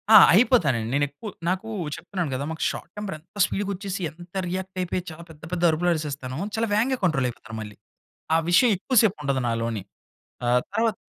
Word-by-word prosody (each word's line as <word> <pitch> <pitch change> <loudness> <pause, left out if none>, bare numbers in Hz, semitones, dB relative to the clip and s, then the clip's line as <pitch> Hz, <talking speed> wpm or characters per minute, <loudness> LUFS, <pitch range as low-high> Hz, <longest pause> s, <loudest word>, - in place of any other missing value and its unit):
ఆ! - - +14 0.2
అయిపోతానండి. 170 - +4
నేను 145 +1 +3
ఎక్కువ 145 +10 -8 0.2
నాకు 190 +4 -1 0.3
చెప్తున్నాను 175 -8 -4
కదా! 135 - -2
మాకు 160 - -4
షార్ట్ - - -7
టెంపర్ 210 -5 -4
ఎంత 170 +6 -14
స్పీడ్‌గా 200 0 -2
వచ్చేసి, 195 0 -4
ఎంత 175 +2 -14
రియాక్ట్ 185 +1 -4
అయిపోయి 180 0 -1
చాలా 165 +2 -10
పెద్ద, 155 -2 -14
పెద్ద 175 -1 -1
అరుపులు 165 +3 +1
అరిసేస్తాను. 140 -4 -4 0.2
చాలా 225 +1 0
వేగంగా 245 +5 +2
కంట్రోల్ 155 -8 +2
అయిపోతాను 110 -1 -9
మళ్ళీ. 105 -1 -8 0.6
ఆ - - +6
విషయం 190 +8 +6
ఎక్కువ 255 +8 -3
సేపు 205 -3 +2
ఉండదు 135 -2 0
నాలోని. 115 -3 -1 0.6
ఆ! - - 0 0.3
తర్వాత 225 -2 +1
175 Hz, 185 wpm, -25 LUFS, 140-200 Hz, 0.6 s, ఆ